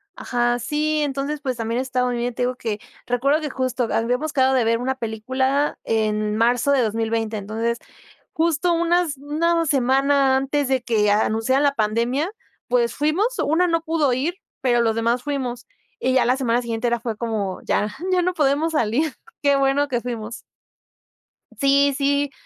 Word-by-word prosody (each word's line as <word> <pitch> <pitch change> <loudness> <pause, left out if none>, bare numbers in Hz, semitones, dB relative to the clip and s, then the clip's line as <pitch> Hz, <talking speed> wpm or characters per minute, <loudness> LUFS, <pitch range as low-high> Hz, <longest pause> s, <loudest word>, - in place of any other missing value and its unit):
Ajá, 240 0 0
sí, 300 +4 0
entonces, 285 +1 -3
pues 260 -4 -3
también 230 +2 -1
está 255 -1 -1
muy 245 -1 -1
bien, 240 +1 -2
te 245 - -1
digo 250 +1 0
que 220 -4 -4 0.3
recuerdo 275 +6 +1
que 300 - -3
justo 255 -2 -1
habíamos 250 +7 0
quedado 265 -1 +3
de 250 - +3
ver 230 +1 +2
una 260 +2 -1
película 260 +5 -1
en 215 -1 0
marzo 245 +4 +2
de 275 -2 +4
2020, 225 0 -1
entonces, 225 +3 -2 0.5
justo 335 +2 +1
unas 340 -2 +1
una 330 +4 0
semana 270 0 +3
antes 275 +1 0
de 260 -2 +1
que 215 -4 +2
anunciaran 225 +6 +2
la 285 -1 +3
pandemia, 235 - 0 0.4
pues, 240 -2 +2
fuimos, 310 +9 +1 0.2
una 330 +4 +3
no 330 -1 +1
pudo 320 -5 +1
ir, 290 +8 -1 0.3
pero 240 -2 +2
los 225 -1 +1
demás 235 +2 0
fuimos, 260 -4 -3 0.3
y 260 - +1
ya 255 -2 +3
la 250 +2 +2
semana 245 -2 +1
siguiente 230 0 -3
era 235 0 0
fue 225 -2 -4
como, 215 -5 -3
ya, 210 - 0 0.2
ya 365 - +3
no 365 +1 0
podemos 300 +2 +1
salir, 275 +3 0 0.3
qué 285 -1 +3
bueno 275 +1 +2
que 245 -3 -1
fuimos. 235 -2 -5 1.2
Sí, 280 0 +4
sí, 285 0 +1
260 Hz, 170 wpm, -22 LUFS, 235-285 Hz, 1.2 s, de